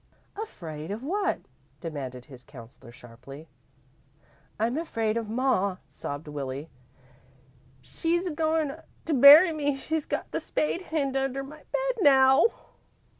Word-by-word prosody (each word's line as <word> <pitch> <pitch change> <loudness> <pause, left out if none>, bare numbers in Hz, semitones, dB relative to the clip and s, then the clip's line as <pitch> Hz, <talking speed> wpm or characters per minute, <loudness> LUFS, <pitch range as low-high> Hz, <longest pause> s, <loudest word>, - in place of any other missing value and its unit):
"Afraid 160 - -7
of 210 +5 -5
what?" 390 +7 -1 0.4
demanded 135 -7 -6
his 130 -3 -14
counsellor, 120 0 -14
sharply. 125 +6 -13 1.1
"I'm 230 +3 0
afraid 225 -9 -2
of 230 -2 -3
ma," 220 -6 0
sobbed 145 +2 -7
Willie. 140 +1 -6 1.1
"She's 340 - -1
a 350 - -3
goin' 315 -1 0 0.3
to 325 - -1
bury 295 +6 +9
me. 290 -2 -1
She's 310 +3 -3
got - - -4
the - - -1
spade 325 +4 -2
hid 290 -6 -2
under 270 0 -1
my 290 +3 -11
bed - - -1
now." 265 +1 +6
265 Hz, 125 wpm, -27 LUFS, -, 1.1 s, bury